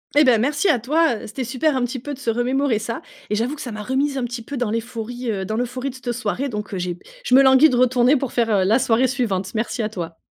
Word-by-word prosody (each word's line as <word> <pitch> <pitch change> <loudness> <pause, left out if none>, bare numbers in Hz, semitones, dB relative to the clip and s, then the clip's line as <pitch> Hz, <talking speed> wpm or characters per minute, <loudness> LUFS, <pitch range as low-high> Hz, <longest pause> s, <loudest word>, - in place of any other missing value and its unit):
Eh, 295 - +7
ben, 250 -5 +5
merci 285 - +1
à 310 - +4
toi, 285 +3 +2
heu, - - -8
c'était 255 +5 -5
super, 265 +5 0
un 260 - 0
petit 245 +2 -2
peu, 290 +4 -6
de 270 - -9
se 275 - -2
remémorer 245 +2 +1
ça 225 +2 -4 0.3
et - - +2
j'avoue 240 +7 -1
que 285 - -9
ça 245 - -6
m'a 215 -1 -6
remise 270 +5 0
un - - -2
petit 240 -1 -6
peu 280 +4 -6
dans 240 -4 -1
l'euphorie, 235 +1 -4
heu, 195 -2 -3
dans 215 +3 -3
l'euphorie 250 +3 -2
de 260 - -9
cette 255 -2 -4
soirée 240 +4 -2
donc 210 -3 -5
heu, - - -2
j'ai 180 -1 -3 0.2
je - - -1
me 265 - +8
languis 265 +3 +6
de - - +1
retourner 250 +2 +4
pour 270 -3 -2
faire, 235 -2 +1
heu, - - +2
la 210 +5 +4
soirée 245 0 +2
suivante. 200 -8 -2
Merci 225 +2 -1
à 215 - -1
toi. 170 -5 -6
245 Hz, 285 wpm, -21 LUFS, 220-265 Hz, 0.3 s, me